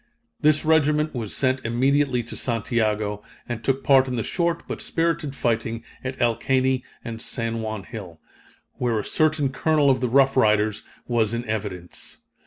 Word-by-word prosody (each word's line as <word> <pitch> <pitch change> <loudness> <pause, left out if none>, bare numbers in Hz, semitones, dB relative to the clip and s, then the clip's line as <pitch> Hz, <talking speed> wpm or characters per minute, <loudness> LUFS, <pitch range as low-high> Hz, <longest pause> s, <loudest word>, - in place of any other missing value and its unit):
This 155 0 +3
regiment 150 -1 +3
was 115 -5 -4
sent 130 -1 +1
immediately 130 +2 +2
to 115 - -8
Santiago, 110 -3 -1 0.3
and 120 -2 -5
took 135 0 0
part 135 -1 +5
in 125 - -2
the 115 - -1
short 170 - -1
but - - -5
spirited 165 -4 -1
fighting 115 -2 -1 0.2
at 130 0 -5
El 120 -2 +3
Caney 130 -1 +1 0.2
and 115 -1 -5
San 115 -2 -2
Juan 110 -2 -4
hill 95 -6 -9 0.6
where 120 -3 +1
a 105 - -2
certain 155 -3 +2
Colonel 145 +1 +3
of 130 - 0
the 125 - 0
Rough 135 +2 +4
Riders 110 -3 +3 0.3
was 115 -2 +1
in 120 +1 -3
evidence. 100 -5 -5
125 Hz, 165 wpm, -24 LUFS, 110-140 Hz, 0.6 s, part